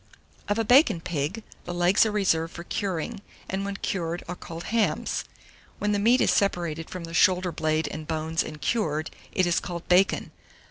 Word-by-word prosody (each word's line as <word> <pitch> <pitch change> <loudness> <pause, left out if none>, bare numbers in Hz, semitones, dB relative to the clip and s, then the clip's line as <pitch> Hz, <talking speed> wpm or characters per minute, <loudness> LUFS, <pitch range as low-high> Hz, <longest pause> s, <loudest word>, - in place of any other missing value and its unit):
Of 205 - 0
a 225 - +2
bacon 245 - +5
pig, 165 +5 -3 0.2
the 175 - -4
legs 175 +5 +4
are - - -1
reserved 170 -6 +1
for 170 - -6
curing, 195 +3 -3 0.3
and 190 +1 -2
when 200 0 -4
cured 170 -4 -2
are 180 - -4
called 165 -1 -8
hams: 225 -1 0 0.5
when 210 - 0
the 205 - +1
meat 235 +5 +4
is - - +4
separated 170 -5 0
from 180 -2 -6
the 165 0 -8
shoulder 180 +1 +4
blade 155 -1 0
and 155 0 -6
bones 160 0 -1
and 155 - -8
cured, 160 -7 -1 0.2
it 185 - +2
is 175 -1 +2
called 175 -1 -6
bacon. 185 +2 +3
175 Hz, 185 wpm, -26 LUFS, 165-200 Hz, 0.5 s, bacon